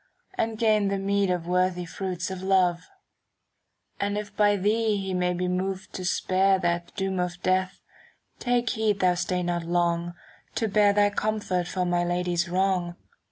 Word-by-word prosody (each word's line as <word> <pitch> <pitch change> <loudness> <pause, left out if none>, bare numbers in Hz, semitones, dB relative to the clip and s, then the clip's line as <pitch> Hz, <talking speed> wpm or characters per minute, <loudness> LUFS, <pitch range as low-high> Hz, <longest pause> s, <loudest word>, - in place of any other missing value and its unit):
And 225 -10 -2
gain 215 -2 +3
the 195 0 0
meed 200 0 +1
of 180 -2 -1
worthy 180 0 +1
fruits 180 +2 -4
of 185 -1 -5
love: 185 -2 +2 1.1
And 200 +1 -1
if 210 -1 -6
by 205 -1 +4
thee 215 +2 +1
he 190 -1 -3
may 180 0 +1
be 180 +1 -2
moved 185 +1 -3
to 185 - -5
spare 190 +1 +2
"^ - - -8
That 175 0 -1
doom 190 -1 -2
of 180 0 -2
death, 185 0 0 0.6
take 245 -1 +1
heed 215 -3 0
thou 185 -1 +4
stay 180 +1 -1
not 175 0 -1
long 170 0 0 0.4
To 225 - 0
bear 205 0 +4
thy 205 0 +3
comfort 205 -4 -1
for 180 0 -1
my 175 0 +1
Lady's 175 0 -1
wrong. 180 -1 0
185 Hz, 170 wpm, -26 LUFS, 175-200 Hz, 1.1 s, by